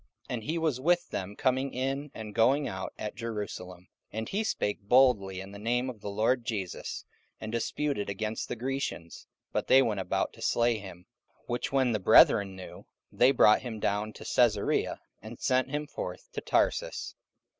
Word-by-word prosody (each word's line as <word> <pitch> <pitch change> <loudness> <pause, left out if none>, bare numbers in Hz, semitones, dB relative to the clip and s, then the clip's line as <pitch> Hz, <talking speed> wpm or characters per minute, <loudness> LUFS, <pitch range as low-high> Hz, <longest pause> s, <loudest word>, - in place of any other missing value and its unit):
44:009:028 - - -3
And 115 -3 -3
he 160 +3 -1
was 155 -6 0
with 175 +4 +2
them 100 +2 -4
coming 130 +2 0
in 135 +2 -2
and 110 -1 -7
going 130 +6 +3
out 95 0 -5
at 105 - -4
Jerusalem. 100 -5 -6 0.2
44:009:029 - - -8
And 110 - -4
he 205 +3 0
spake 105 - -1
boldly 100 -4 +3
in 95 +1 -8
the 100 - -9
name 125 +4 0
of 110 -5 -15
the 105 - -5
Lord 115 +5 +1
Jesus, 105 -7 -4 0.3
and 110 - -6
disputed 115 0 -1
against 105 +2 -3
the - - -2
Grecians: 125 -9 -4 0.2
but - - -2
they 135 0 +7
went 110 -5 -1
about 95 - -1
to - - -15
slay 120 -1 +2
him. 90 -3 -11 0.4
44:009:030 - - -32
Which 125 +5 -2
when 130 -3 +2
the 105 - 0
brethren 95 0 +6
knew, 95 -1 -10 0.2
they 125 - +5
brought 110 -5 +5
him 115 -4 -6
down 105 +1 -1
to - - -11
Caesarea, 115 -5 +1 0.2
and 110 +2 -10
sent 130 0 +1
him 150 +2 -2
forth - - -7
to - - -5
Tarsus. - - 0
115 Hz, 190 wpm, -29 LUFS, 105-130 Hz, 0.4 s, they